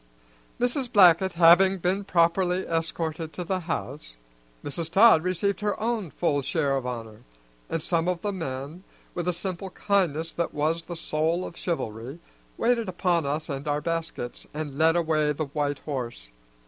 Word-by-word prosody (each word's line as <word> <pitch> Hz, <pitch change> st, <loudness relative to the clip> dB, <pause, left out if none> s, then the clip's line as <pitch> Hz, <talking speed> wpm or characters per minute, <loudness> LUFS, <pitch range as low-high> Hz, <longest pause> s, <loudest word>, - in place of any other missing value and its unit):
Mrs. 245 Hz, +1 st, 0 dB
Blackett 190 Hz, -3 st, +6 dB
having 180 Hz, +3 st, +6 dB
been 185 Hz, +3 st, 0 dB
properly 180 Hz, +1 st, +2 dB
escorted 165 Hz, -1 st, -2 dB
to 180 Hz, -, -4 dB
the 185 Hz, +2 st, -1 dB
house, -, -, -5 dB, 0.5 s
Mrs. 160 Hz, +3 st, -3 dB
Todd 200 Hz, -5 st, +7 dB
received 185 Hz, +3 st, -1 dB
her 210 Hz, -1 st, -1 dB
own 220 Hz, -5 st, -1 dB
full 145 Hz, -2 st, 0 dB
share 140 Hz, 0 st, 0 dB
of 130 Hz, -2 st, -2 dB
honor, 115 Hz, -3 st, -6 dB, 0.5 s
and 165 Hz, -2 st, -2 dB
some 170 Hz, -1 st, 0 dB
of 180 Hz, -1 st, 0 dB
the 205 Hz, -, 0 dB
men, 155 Hz, -1 st, -5 dB, 0.3 s
with 175 Hz, 0 st, -3 dB
a -, -, +3 dB
simple 185 Hz, +2 st, -5 dB
kindness 170 Hz, -6 st, 0 dB
that 170 Hz, -, -3 dB
was 160 Hz, +3 st, 0 dB
the 175 Hz, -, -6 dB
soul 165 Hz, +2 st, -1 dB
of -, -, -8 dB
chivalry, 125 Hz, -6 st, -4 dB, 0.4 s
waited 230 Hz, -3 st, +1 dB
upon 175 Hz, -4 st, +1 dB
us 150 Hz, +3 st, -2 dB
and 140 Hz, -1 st, -5 dB
our 145 Hz, 0 st, +1 dB
baskets 165 Hz, -6 st, -4 dB
and 150 Hz, -3 st, -4 dB
led 160 Hz, +3 st, +4 dB
away 155 Hz, -3 st, +1 dB
the 155 Hz, +2 st, -3 dB
white 145 Hz, 0 st, -2 dB
horse. 120 Hz, -, -5 dB
165 Hz, 160 wpm, -26 LUFS, 150-185 Hz, 0.5 s, Todd